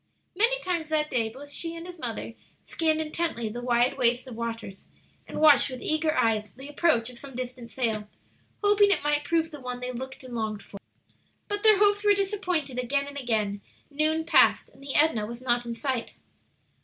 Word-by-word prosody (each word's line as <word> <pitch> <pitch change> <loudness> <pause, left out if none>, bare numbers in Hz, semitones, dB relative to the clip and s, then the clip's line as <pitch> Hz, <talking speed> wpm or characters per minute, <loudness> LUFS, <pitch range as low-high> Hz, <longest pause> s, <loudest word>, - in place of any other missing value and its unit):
Many 470 +6 +3
times 340 -4 -2
that 305 -1 0
day 230 -3 +1
both 280 +5 -12
she 330 +2 -2
and 335 0 -8
his 355 -1 -10
mother 230 -2 -5 0.3
scanned 315 -1 0
intently 310 -7 -2
the 240 +3 -6
wide 245 +2 +1
waste 245 +1 +2
of 245 - -8
waters, 230 -4 -6 0.4
and - - -5
watched 295 -4 +6
with 255 -1 -7
eager 310 0 +1
eyes 215 -2 +1
the 265 +2 -11
approach 290 -6 +1
of 240 - -10
some 275 -3 -10
distant 250 -1 -6
sail, 220 -5 -1 0.5
hoping 410 0 +5
it 395 - +1
might 295 0 +1
prove 325 -1 +1
the 295 - -9
one 250 -1 -5
they 250 0 -4
looked 260 +2 -7
and 255 -1 -9
longed 215 -3 -3
for. 200 - -11 0.7
But 410 0 -2
their 430 -1 +7
hopes 410 0 +3
were 410 -1 +5
disappointed 365 -9 -1
again 280 +3 0
and 285 0 -8
again; 215 -6 -1 0.3
noon 310 +2 +1
passed, - - +4
and - - -20
the 275 0 -5
Edna 260 -9 +3
was 235 +1 -7
not 240 -1 0
in 235 - -4
sight. 255 -1 -3
270 Hz, 195 wpm, -27 LUFS, 235-320 Hz, 0.7 s, their